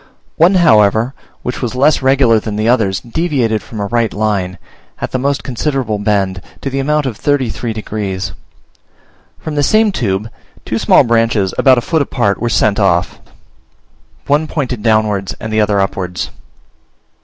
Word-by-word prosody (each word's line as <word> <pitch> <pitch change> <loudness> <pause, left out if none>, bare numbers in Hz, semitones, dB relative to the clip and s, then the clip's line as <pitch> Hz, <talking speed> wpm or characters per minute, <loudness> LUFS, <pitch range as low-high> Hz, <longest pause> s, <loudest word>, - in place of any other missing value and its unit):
One, 175 +4 +4
however, 110 - +4 0.3
which 125 - -4
was 125 -1 -3
less 140 +4 +3
regular 130 -4 +4
than 105 -1 -5
the 110 +1 -1
others, 110 -6 +1
deviated 120 -5 -1
from 110 - -9
a 100 - -1
right 115 +1 0
line, 100 -4 -1 0.4
at - - -4
the 130 - -1
most 140 +2 -1
considerable 130 -4 -2
bend, 100 -2 0 0.2
to 135 - -3
the 135 - -2
amount 150 +2 0
of 120 -6 -3
thirty 140 -5 0
three 120 - -4
degrees. 100 -3 -4 1.1
From 155 - -6
this 145 -1 +1
same 215 -1 +3
tube, 105 - -2 0.4
two - - -2
small - - +5
branches, 115 -4 +1
about 130 -2 +4
a - - +1
foot 160 +5 0
apart, 120 -8 0
were 120 - 0
sent 110 -2 +2
off; 90 -3 +1 1.1
one 150 +2 +1
pointed 130 -7 -3
downwards, 110 -3 +1
and 110 0 -5
the 110 - +3
other 105 -1 +1
upwards. 90 -2 -2
115 Hz, 165 wpm, -15 LUFS, 105-135 Hz, 1.1 s, small